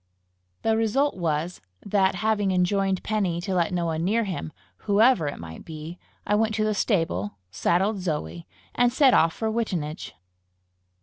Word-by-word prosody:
The 225 0 +2
result 225 +6 +1
was, 165 0 -2 0.2
that, 195 -2 +2
having 210 -2 +2
enjoined 190 +1 +1
Penny 195 -6 0
to 190 +1 -3
let 175 -1 +1
no 175 -1 -1
one 160 0 -1
near 220 +6 +2
him, 180 - -4 0.4
whoever 205 - +4
it 145 - -4
might 80 -1 -9
be, 160 +2 -8 0.3
I 205 - 0
went 215 +1 +2
to 215 - +1
the 215 0 +1
stable, 165 - -1
saddled 190 - +1
Zoe, 90 - -4 0.3
and 245 0 +3
set 265 0 +5
off 165 0 +5
for 220 -1 -2
Wittenage. 180 - -3
190 Hz, 160 wpm, -25 LUFS, 165-215 Hz, 0.4 s, set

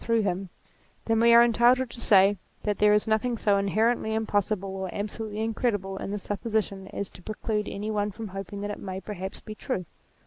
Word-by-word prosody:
through 230 -1 +2
him, 190 -1 -2 0.6
then 225 0 +2
we 235 +1 +6
are 235 0 +9
entitled 240 +2 +4
to 235 0 -9
say 200 -2 +5 0.3
that 210 -1 -1
there 210 0 +5
is 210 0 +4
nothing 225 +2 +1
so 205 -2 +3
inherently 220 +2 +1
impossible 205 -3 -1
or 190 -1 -4
absolutely 210 +1 -4
in 225 0 -1
credible 205 -5 -1
in - - -5
this 205 -1 -4
supposition 205 -2 -2
as 200 0 -5
to - - -14
preclude 215 +1 -2
any 210 +2 -4
one 205 -1 0
from 215 +1 -7
hoping 195 +1 -6
that 205 0 -3
it - - -6
may 190 -1 -5
perhaps 195 -1 -6
be 215 - -8
true. 215 -4 -3
210 Hz, 205 wpm, -27 LUFS, 195-225 Hz, 0.6 s, are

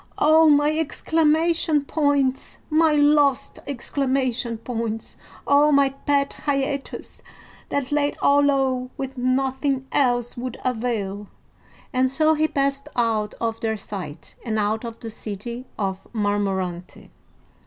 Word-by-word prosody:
"Oh, 315 +1 +5
my 295 +1 +4
exclamation 320 -1 +1
points, 285 -3 0
my 315 0 +4
lost 290 -2 +3
exclamation 260 -3 -1
points! 225 -1 -4 0.3
Oh, 290 +1 +5
my 280 -1 +4
pet 280 +1 0
hiatus 275 0 -2 0.5
that 280 -1 -2
laid 290 0 +1
all 285 0 +4
low 265 -3 +1
when 270 0 -5
nothing 265 +1 0
else 245 -3 +1
would 245 0 -5
avail!" 220 -5 -2 0.7
and 255 0 +2
so 310 +4 +3
he 310 0 +2
passed 275 -1 -1
out 225 -3 0
of 225 -1 -3
their 220 -1 -1
sight, 195 -7 -8
and 220 -3 -2
out 215 +2 0
of 230 -1 -7
the 225 - -6
city 235 +4 -7
of 195 -2 -3
Marmorante. 195 -4 -2
260 Hz, 120 wpm, -23 LUFS, 225-285 Hz, 0.7 s, Oh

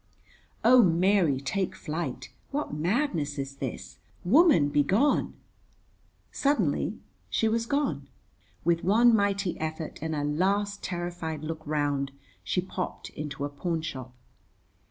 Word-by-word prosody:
Oh, 245 +2 +8
Mary, 175 - +3
take 185 +8 -2
flight. 150 -6 -5 0.2
What 290 - -3
madness 165 - 0
is 135 0 -5
this? - - -6 0.3
Woman, 265 - +5
be 145 0 +3
gone. 215 - +2 1.0
Suddenly 285 +1 +1 0.3
she 225 - +1
was 230 +1 0
gone. 285 +2 -1 0.6
With 170 -1 +2
one 230 +5 +5
mighty 200 -3 0
effort 160 0 -4
and 160 0 -2
a 145 - -1
last 200 +7 0
terrified 175 -3 -4
look 160 0 -4
round, 145 -2 0 0.3
she 180 - 0
popped 185 0 -5
into 145 -1 -5
a - - -3
pawnshop. 145 -4 -4
170 Hz, 120 wpm, -28 LUFS, 150-205 Hz, 1.0 s, Oh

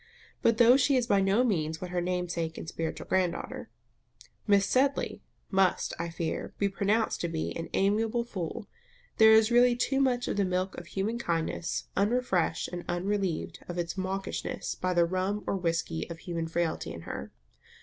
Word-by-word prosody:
But 230 -1 +3
though 240 +2 +7
she 275 +1 +3
is 250 -2 +2
by 200 -4 +3
no 195 +5 +3
means 160 -9 0
what 180 -1 -6
her 180 -1 0
namesake 175 -2 -2
and - - -7
spiritual 165 0 -4
grand 185 -2 +2
daughter. - - -7 0.8
Miss 200 -1 +5
Sedley, 270 +5 +1 0.3
must, 190 -2 +2
I 170 0 -2
fear, 165 -1 -4
be 200 - +1
pronounced 205 +3 0
to 170 - 0
be, 160 -1 -3
an 165 - -5
amiable 220 +4 +2
fool, 195 -3 -5 0.5
there 220 0 +8
is 220 +1 +6
really 240 0 +5
too 270 +3 +1
much 250 -2 +1
of - - -2
the 200 - +3
milk 185 0 -1
of 175 - -8
human 205 +5 -2
kindness, 170 -3 -2
unrefreshed 200 -6 +1
and 175 -1 -6
unrelieved 190 -1 -1
of 175 - -4
its 170 0 -2
mawkishness 190 0 -3
by 185 0 -2
the 170 -1 +5
rum 185 +4 -1
or - - 0
whisky 165 - -2
of 170 - -6
human 165 -1 -4
frailty, 160 - -1
in 85 0 -7
her. - - -6
190 Hz, 180 wpm, -29 LUFS, 170-220 Hz, 0.8 s, there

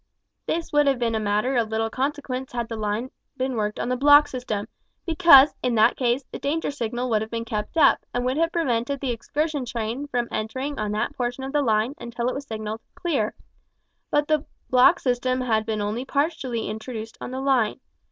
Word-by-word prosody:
This 330 -1 -2
would 295 -1 +4
have 275 -2 +3
been 235 -2 0
a 220 - 0
matter 215 +5 0
of 230 -3 +1
little 225 0 -1
consequence 265 -1 -3
had 235 -1 -2
the 225 - -5
line 215 +3 -2 0.3
been 260 0 -1
worked 210 -1 -2
on - - -2
the 255 - 0
block 290 +3 +6
system, 220 -5 -4 0.4
because, 320 -4 +7
in 245 -2 0
that 215 - +5
case, 250 +1 0
the - - -6
danger 295 +3 -1
signal 245 -2 -3
would 215 -1 +2
have 220 - -4
been 230 0 -4
kept 215 +6 -4
up, 310 - +6
and 245 0 -2
would 255 +1 0
have 330 +1 +2
prevented 275 -4 0
the 265 -2 -1
excursion 290 +5 -2
train 235 +3 -4
from 245 -3 -1
entering 260 +7 -3
on 210 -1 -1
that 215 +3 -2
portion 245 +1 -3
of 270 - -5
the 295 - +3
line 225 0 +1
until 235 0 -3
it - - -2
was 280 +1 -6
signalled 220 0 -5
"clear;" 275 -12 -1 0.7
but 295 0 +1
the 305 -2 +2 0.3
block 255 +7 +6
system 255 0 0
had 220 -3 0
been 215 -2 -1
only 210 +4 -2
partially 275 -5 -1
introduced 220 +1 -6
on - - -5
the 260 +1 -4
line. 265 -5 +1
250 Hz, 205 wpm, -24 LUFS, 225-280 Hz, 0.7 s, because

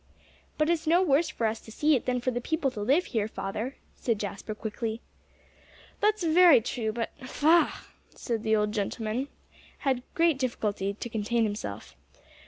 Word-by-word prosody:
"But 305 - +2
it's 330 -1 -1
no 345 +4 +5
worse 315 0 +3
for 230 - -2
us 220 0 0
to 220 - -13
see 300 +6 +3
it 250 - -2
than 250 0 +1
for 255 - 0
the 245 0 -3
people 305 0 0
to 215 -4 -6
live 275 - +3
here, 215 -4 -1
father," 220 +5 -4 0.2
said 230 -3 -1
Jasper 205 +1 -5
quickly. 220 +1 -4 1.0
"That's 425 -2 +2
very 335 -4 +7
true 225 -1 -2
but 230 +1 -3
faugh!" 315 +6 +2 0.4
and 230 -3 -1
the 220 0 +3
old 210 0 +1
gentleman 220 +4 -2 0.6
had 260 -2 +2
great 335 -5 +3
difficulty 205 -6 -1
to 230 - -5
contain 225 +1 0
himself. 210 0 -4
240 Hz, 170 wpm, -28 LUFS, 220-300 Hz, 1.0 s, very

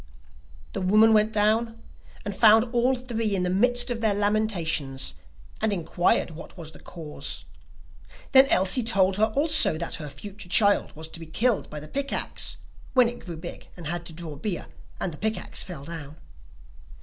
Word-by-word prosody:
The - - -3
woman 215 +4 +5
went 215 0 +4
down, 225 +2 +1 0.5
and 205 -1 -4
found 220 +1 +6
all 245 +2 +3
three 230 -4 -2
in 185 - 0
the 180 - 0
midst 245 +5 +2
of 230 -1 -3
their 215 -3 +2
lamentations, 175 - 0 0.5
and 220 0 +1
inquired 175 -1 +1
what 165 +3 -11
was 160 -2 -8
the - - -15
cause; 160 -4 -6 0.9
then 270 0 +8
Elsie 190 +2 +3
told 195 -4 +2
her 220 +1 +3
also 305 - +4
that 170 +1 -3
her 150 - -6
future 200 +4 -9
child 205 +1 +4
was 160 +1 -6
to 165 - -8
be 165 - -9
killed 225 +7 0
by 150 - -6
the 150 - -10
pick 280 - -3
axe, - - -1 0.4
when 250 -2 +6
it 240 - -9
grew 170 -3 -7
big 170 +2 -9
and 170 - -9
had 170 +2 -4
to 165 - -9
draw 160 -2 -7
beer, 175 +5 -4 0.3
and 175 - -3
the 150 - -11
pick 220 +1 0
axe - - -5
fell 165 -7 -7
down. 155 -2 -8
200 Hz, 185 wpm, -26 LUFS, 165-225 Hz, 0.9 s, then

